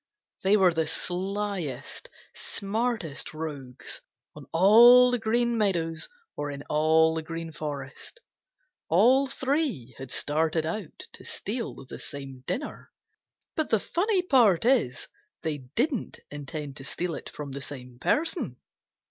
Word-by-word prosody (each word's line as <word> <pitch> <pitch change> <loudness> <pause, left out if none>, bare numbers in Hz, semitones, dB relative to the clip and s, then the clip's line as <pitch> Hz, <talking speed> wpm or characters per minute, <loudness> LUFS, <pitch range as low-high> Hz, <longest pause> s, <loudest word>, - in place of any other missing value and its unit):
They 195 +2 +5
were 185 -3 +5
the 160 -1 0
slyest, 185 -2 -3 0.2
smartest 200 -8 -2
rogues 140 -5 -6 0.3
on - - -11
all 240 +8 +8
the 245 - +1
Green 235 +1 +1
Meadows 165 -6 0 0.3
or 145 0 -3
in 140 0 -6
all 160 +1 +4
the 160 - -2
Green 165 +1 -6
Forest. 145 - -7 0.7
All 265 +3 +5
three 265 - -1
had 135 -1 -7
started 155 +4 0
out 170 +1 -5
to - - -11
steal 230 - -4
the - - -9
same 135 -2 -8
dinner, 290 - -4 0.7
but 315 -2 0
the 220 - +4
funny 375 - +1
part 230 - +4
is 230 - +2 0.4
they 150 -2 -1 0.2
didn't 255 -1 0
intend 145 0 -6
to 135 - -8
steal 175 +4 -3
it - - -6
from 145 -2 -7
the 140 +1 -6
same 125 -3 -9
person. 310 - 0
165 Hz, 130 wpm, -27 LUFS, 145-235 Hz, 0.7 s, all